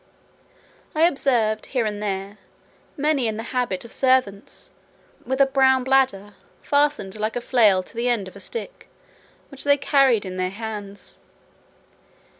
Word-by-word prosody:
I 310 Hz, -, +3 dB
observed, 240 Hz, -9 st, +1 dB
here 235 Hz, -, +2 dB
and 210 Hz, -1 st, -3 dB
there, 200 Hz, 0 st, -4 dB, 0.6 s
many 290 Hz, -4 st, +1 dB
in 215 Hz, -1 st, -3 dB
the 225 Hz, -, -4 dB
habit 245 Hz, -6 st, -1 dB
of 235 Hz, -, -12 dB
servants, 255 Hz, -7 st, 0 dB, 0.6 s
with 265 Hz, +1 st, -1 dB
a 275 Hz, -, +7 dB
blown 265 Hz, -1 st, +3 dB
bladder, 255 Hz, -7 st, +1 dB, 0.3 s
fastened 285 Hz, -9 st, 0 dB
like 215 Hz, +1 st, -2 dB
a -, -, 0 dB
flail 215 Hz, -7 st, +3 dB
to 230 Hz, -, -13 dB
the 240 Hz, +2 st, 0 dB
end 220 Hz, -6 st, 0 dB
of 185 Hz, -, -12 dB
a -, -, -10 dB
stick, 475 Hz, -, -7 dB, 0.6 s
which 275 Hz, -2 st, -5 dB
they 285 Hz, 0 st, +4 dB
carried 270 Hz, -7 st, +3 dB
in 185 Hz, 0 st, -6 dB
their 185 Hz, 0 st, -1 dB
hands. 205 Hz, -1 st, -8 dB
230 Hz, 150 wpm, -23 LUFS, 205-270 Hz, 0.6 s, a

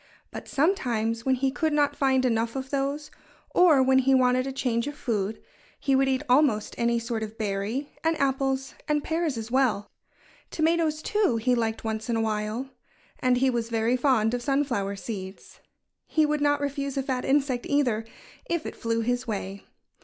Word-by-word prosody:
But -, -, -8 dB
sometimes 235 Hz, -, 0 dB
when 260 Hz, -, +4 dB
he 265 Hz, +1 st, 0 dB
could 310 Hz, +4 st, 0 dB
not 290 Hz, -1 st, +2 dB
find 265 Hz, -2 st, +2 dB
enough 230 Hz, -1 st, 0 dB
of 265 Hz, 0 st, -5 dB
those, 280 Hz, +2 st, -2 dB, 0.4 s
or 315 Hz, -7 st, +5 dB
when 265 Hz, 0 st, +4 dB
he 265 Hz, +1 st, +4 dB
wanted 255 Hz, 0 st, +3 dB
a -, -, -2 dB
change 250 Hz, -2 st, -1 dB
of 290 Hz, -, -5 dB
food, 215 Hz, -3 st, -2 dB, 0.4 s
he 275 Hz, -1 st, +1 dB
would 270 Hz, 0 st, +3 dB
eat 265 Hz, +1 st, 0 dB
almost 250 Hz, -5 st, +3 dB
any 235 Hz, 0 st, +1 dB
sort 230 Hz, -1 st, -3 dB
of 220 Hz, 0 st, -6 dB
berry, 215 Hz, +6 st, -2 dB
and 325 Hz, 0 st, +1 dB
apples 270 Hz, -1 st, 0 dB
and 300 Hz, -1 st, +1 dB
pears 320 Hz, -5 st, -1 dB
as 225 Hz, +1 st, -6 dB
well. 250 Hz, -6 st, +1 dB, 0.6 s
Tomatoes, 320 Hz, -1 st, +1 dB
too, 415 Hz, -, +1 dB
he 250 Hz, +3 st, +1 dB
liked 225 Hz, -2 st, -1 dB
once 220 Hz, +1 st, -3 dB
in 235 Hz, -, +1 dB
a 225 Hz, -, +1 dB
while. 220 Hz, +4 st, -2 dB, 0.5 s
And 250 Hz, -1 st, +2 dB
he 260 Hz, +1 st, +3 dB
was 235 Hz, -1 st, -2 dB
very 230 Hz, +1 st, +1 dB
fond 245 Hz, -4 st, +2 dB
of 245 Hz, -, -1 dB
sunflower 240 Hz, -8 st, 0 dB
seeds. 195 Hz, -2 st, -8 dB, 0.5 s
He 310 Hz, -1 st, +3 dB
would 300 Hz, 0 st, 0 dB
not 290 Hz, 0 st, +2 dB
refuse 280 Hz, -1 st, -3 dB
a 270 Hz, -, 0 dB
fat 260 Hz, -2 st, -2 dB
insect, 270 Hz, -3 st, +1 dB
either, 250 Hz, -7 st, +1 dB, 0.5 s
if 340 Hz, -2 st, -1 dB
it -, -, -5 dB
flew 230 Hz, 0 st, -1 dB
his 245 Hz, +2 st, -1 dB
way. 200 Hz, -2 st, -5 dB
255 Hz, 185 wpm, -26 LUFS, 230-280 Hz, 0.6 s, or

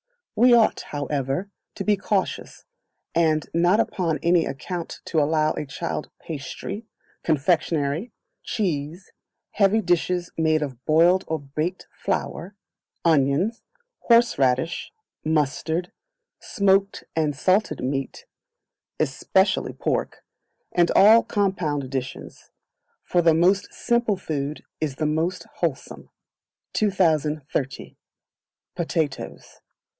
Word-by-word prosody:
We 245 Hz, +3 st, +5 dB
ought, 225 Hz, -2 st, +3 dB
however, 145 Hz, +5 st, -2 dB, 0.2 s
to 200 Hz, -, -4 dB
be 210 Hz, +1 st, +3 dB
cautious, 200 Hz, 0 st, -2 dB, 0.5 s
and 160 Hz, -2 st, +2 dB
not 175 Hz, +5 st, +3 dB
upon 170 Hz, -8 st, 0 dB
any 170 Hz, 0 st, +4 dB
account 170 Hz, +5 st, -5 dB
to 160 Hz, -, 0 dB
allow 155 Hz, +1 st, +2 dB
a 150 Hz, -, -4 dB
child 135 Hz, -, -4 dB
pastry, 170 Hz, -, -6 dB, 0.3 s
confectionery, 160 Hz, -, 0 dB, 0.3 s
cheese, 170 Hz, -3 st, -3 dB, 0.4 s
heavy 200 Hz, +1 st, +3 dB
dishes 175 Hz, -1 st, 0 dB
made 155 Hz, -1 st, +2 dB
of 130 Hz, -4 st, -7 dB
boiled 170 Hz, +4 st, +4 dB
or 160 Hz, -, -1 dB
baked 155 Hz, +6 st, -4 dB
flour, 195 Hz, -1 st, -3 dB, 0.5 s
onions, 160 Hz, -, +2 dB, 0.4 s
horseradish, 165 Hz, -, +2 dB, 0.3 s
mustard, 160 Hz, +3 st, 0 dB, 0.5 s
smoked 195 Hz, 0 st, +1 dB
and 155 Hz, -3 st, +1 dB
salted 185 Hz, -, +1 dB
meat, 135 Hz, -, -3 dB, 0.7 s
especially -, -, +1 dB
pork, -, -, -2 dB, 0.5 s
and 175 Hz, -1 st, +3 dB
all 220 Hz, +3 st, +8 dB
compound 175 Hz, -, -1 dB
dishes; 130 Hz, -1 st, -6 dB, 0.5 s
for 175 Hz, -, +2 dB
the 165 Hz, -2 st, +4 dB
most 185 Hz, +4 st, +2 dB
simple 235 Hz, -4 st, 0 dB
food 150 Hz, -3 st, -4 dB, 0.2 s
is 150 Hz, -4 st, -2 dB
the 155 Hz, -, -2 dB
most 165 Hz, +4 st, -1 dB
wholesome. 160 Hz, -6 st, -3 dB, 0.6 s
2030. 155 Hz, -8 st, 0 dB, 0.8 s
Potatoes. 160 Hz, -5 st, -3 dB
165 Hz, 100 wpm, -24 LUFS, 150-190 Hz, 0.8 s, all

